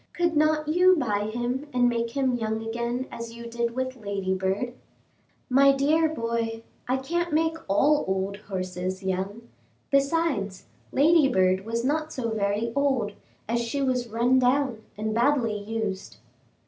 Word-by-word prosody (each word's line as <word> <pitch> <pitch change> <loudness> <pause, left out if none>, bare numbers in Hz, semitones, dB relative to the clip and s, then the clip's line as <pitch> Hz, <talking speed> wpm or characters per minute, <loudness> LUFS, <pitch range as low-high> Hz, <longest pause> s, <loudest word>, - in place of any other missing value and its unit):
Could 345 -2 0
not 305 0 +2
you 360 +4 +5
buy 210 -6 0
him 245 +5 -2
and 245 0 +4
make 235 -1 0
him 265 -2 +2
young 220 -1 -2
again 235 +2 -2
as 230 0 -7
you 235 0 -9
did 235 0 -2
with 260 0 -2
Ladybird?" 195 +2 -2 0.7
"My 275 +1 +6
dear 310 +4 +3
boy, 230 -4 -2 0.2
I 255 +1 +1
can't 340 +6 -2
make 320 +1 +2
all 285 +10 +3
old 190 +1 -1
horses 185 -2 -4
young; 190 +5 -3 0.4
besides, 275 - +1 0.3
Ladybird 265 - +4
was 230 +1 -2
not 310 +3 0
so 230 -3 -3
very 215 +2 -1
old, 265 -7 +1 0.4
as 235 +2 0
she 235 +4 -2
was 255 -3 0
run 240 +4 +3
down 255 -2 +1 0.2
and 215 +1 -2
badly 235 -2 +2
used." 210 - -4
235 Hz, 145 wpm, -26 LUFS, 210-275 Hz, 0.7 s, My